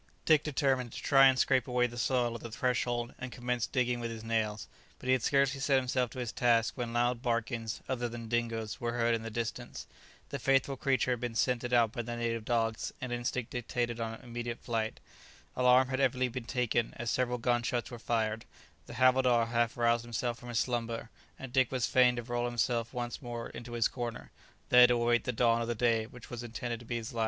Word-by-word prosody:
Dick 155 -2 +5
determined 135 -5 0
to - - -7
try 135 -1 +7
and 130 0 +4
scrape 130 -2 +2
away 125 -1 +2
the 120 0 -5
soil 120 -1 +1
at 115 - -7
the 115 - -7
threshold, 120 -1 -1
and 130 0 -6
commenced 125 -1 -2
digging 125 -2 +1
with 120 -1 -3
his 115 -1 -7
nails. 110 -2 -1 0.3
But - - -13
he 130 - +3
had 130 - +2
scarcely 135 +1 +2
set 135 0 +2
himself 130 -1 +1
to - - -12
his 125 -3 -3
task 115 -2 +2
when 120 -3 -3
loud 120 0 +1
barkings, 115 -2 -2
other 120 -2 -2
than 115 -1 -7
Dingo's, 115 -2 -2
were 120 0 -1
heard 120 -1 +2
in 115 - 0
the 115 - -5
distance. 115 +1 -5 0.4
The 140 - -4
faithful 135 +1 +2
creature 130 -2 +1
had 125 - 0
been 120 -1 -4
scented 120 +1 0
out 120 -3 +4
by 120 0 -3
the 120 +1 -5
native 115 -1 -2
dogs, 115 -2 0
and 125 -1 -4
instinct 120 0 -3
dictated 120 -1 -2
an 115 0 -4
immediate 120 0 -5
flight. 110 -2 -2 0.6
Alarm 125 +1 +5
had 130 0 -1
evidently 130 -1 +2
been 125 0 -6
taken, 120 -1 0
as 120 -1 -2
several 125 -1 0
gun 120 0 +1
shots 120 +1 -2
were 120 - -7
fired; 110 -1 -1 0.4
the 120 - -9
havildar 125 -2 +4
half 120 0 0
roused 120 0 +2
himself 120 0 -3
from 120 - -10
his 120 - -2
slumber, 115 -1 -2 0.3
and 135 -2 -9
Dick 130 -2 +3
was 130 -3 0
fain 125 -1 +4
to 120 - -4
roll 120 0 -2
himself 120 -1 0
once 120 -1 -4
more 120 -2 -5
into 120 0 -8
his 115 -2 +2
corner, 120 -2 -6 0.4
there 125 0 +8
to 125 - +3
await 120 0 +2
the 125 - 0
dawn 115 0 +2
of 115 - -2
the 120 - -1
day 115 -1 +1
which 125 0 -13
was 120 -1 -5
intended 120 0 -4
to 120 - -14
be 120 - -2
his 115 0 -5
last. 115 - -4
120 Hz, 220 wpm, -31 LUFS, 115-125 Hz, 0.6 s, there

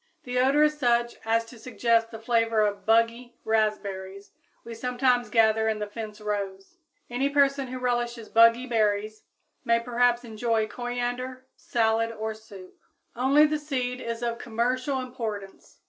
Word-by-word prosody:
The 250 0 -2
odor 275 +4 +4
is 300 0 +1
such 240 -2 +1
as 230 +1 +1
to 230 0 -14
suggest 230 -1 +1
the 225 - -8
flavor 225 -1 +1
of 205 -1 -1
"buggy" 230 +2 +1
raspberries 200 -3 -2 0.3
we 230 - -8
sometimes 245 0 0
gather 220 0 +3
in 220 - -1
the 210 - -3
fence 210 0 -8
rows. 200 - -5 0.3
Any 255 +3 -1
person 280 -1 +2
who 255 +1 -6
relishes 240 -2 -2
buggy 230 +2 +5
berries 215 -2 -1 0.4
may 230 0 +3
perhaps 245 0 +1
enjoy 225 -1 -1
coriander 245 +2 -4
salad 225 -1 0
or 220 0 -4
soup. 205 -4 -14 0.4
Only 270 +5 +5
the 305 0 0
seed 255 -4 -3
is 230 0 -4
of 235 0 -2
commercial 255 +4 -1
importance. 220 -6 -7
230 Hz, 145 wpm, -26 LUFS, 220-250 Hz, 0.4 s, buggy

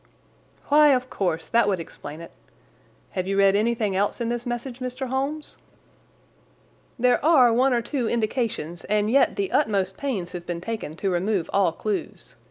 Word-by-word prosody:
"Why, 300 +1 +6
of 255 0 -3
course, 170 -4 -1
that 235 -2 +2
would 190 -3 +1
explain 155 -1 -9
it. 170 - -10 0.8
Have 185 0 -3
you 195 0 -1
read 195 0 +5
anything 215 -2 +1
else 200 +5 0
in 235 -1 -1
this 240 +1 -3
message, 240 +1 -4
Mr. 255 +1 -4
Holmes?" 275 +4 -2 1.4
"There 250 +1 +2
are 270 -7 +6
one 260 +3 +3
or 240 -2 +1
two 245 -1 -2
indications, 215 - -2
and 210 +1 +1
yet 275 +2 +4
the 395 -1 -2
utmost 195 -9 +1
pains 215 -11 -3
have 175 -1 -8
been 175 -1 -3
taken 185 -5 -5
to 195 +3 -1
remove 185 0 -1
all 195 -4 +3
clues. 205 +5 -5
225 Hz, 170 wpm, -24 LUFS, 190-255 Hz, 1.4 s, Why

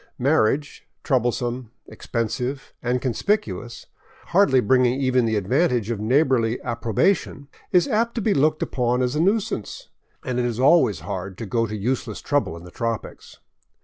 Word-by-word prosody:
Marriage, 140 +1 +1 0.2
troublesome, 125 -1 -1 0.2
expensive, 125 +3 -4
and 125 +1 -1
conspicuous, 120 - -2 0.4
hardly 175 -8 +4
bringing 125 +2 +3
even 130 -3 +2
the 110 - 0
advantage 120 - +1
of 115 - -3
neighborly 125 0 +2
approbation, 120 - 0 0.2
is 180 +4 +4
apt 235 -1 0
to 235 - -1
be 210 0 +2
looked 155 +2 +2
upon 125 0 0
as 125 +3 -1
a - - 0
nuisance; 200 - -1 0.4
and 125 -1 -1
it 125 - +1
is 120 -1 -2
always 130 - +4
hard 95 +1 -5
to 115 - -5
go 115 +3 0
to 110 - -5
useless 115 0 -2
trouble 145 - -1
in 85 - -12
the 90 - -12
tropics. 115 +1 -5
125 Hz, 150 wpm, -23 LUFS, 115-140 Hz, 0.4 s, hardly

